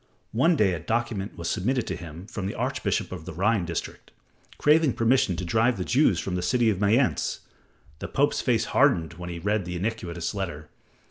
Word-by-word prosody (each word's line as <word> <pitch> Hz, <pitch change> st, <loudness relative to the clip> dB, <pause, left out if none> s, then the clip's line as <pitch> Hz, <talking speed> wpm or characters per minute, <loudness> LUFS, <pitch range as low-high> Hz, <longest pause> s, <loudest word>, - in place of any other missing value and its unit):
One 165 Hz, +10 st, +3 dB
day 100 Hz, -9 st, +3 dB
a 85 Hz, -, -3 dB
document 110 Hz, +2 st, -2 dB
was 85 Hz, -, -4 dB
submitted 125 Hz, +9 st, 0 dB
to -, -, -3 dB
him 85 Hz, +1 st, -9 dB
from 100 Hz, -4 st, -5 dB
the -, -, -4 dB
archbishop -, -, -1 dB
of 85 Hz, -4 st, -7 dB
the 95 Hz, -, -7 dB
Rhine 100 Hz, +2 st, +1 dB
district, 85 Hz, -1 st, -5 dB, 0.5 s
craving 150 Hz, -3 st, +4 dB
permission 115 Hz, -5 st, +2 dB
to 90 Hz, -, -4 dB
drive 115 Hz, +5 st, +2 dB
the 90 Hz, -, -3 dB
Jews 120 Hz, -, +3 dB
from 95 Hz, -, -3 dB
the 90 Hz, -, -1 dB
city 120 Hz, +3 st, +2 dB
of 95 Hz, -, -3 dB
Mayence. 115 Hz, +6 st, +2 dB, 0.6 s
The -, -, -5 dB
Pope's 145 Hz, +2 st, +1 dB
face 115 Hz, -3 st, +1 dB
hardened 90 Hz, -, +3 dB
when 90 Hz, 0 st, -6 dB
he 85 Hz, -, -5 dB
read 105 Hz, +4 st, 0 dB
the 90 Hz, 0 st, -5 dB
iniquitous 90 Hz, -3 st, -3 dB
letter. 85 Hz, -7 st, -5 dB
100 Hz, 195 wpm, -26 LUFS, 90-120 Hz, 0.6 s, craving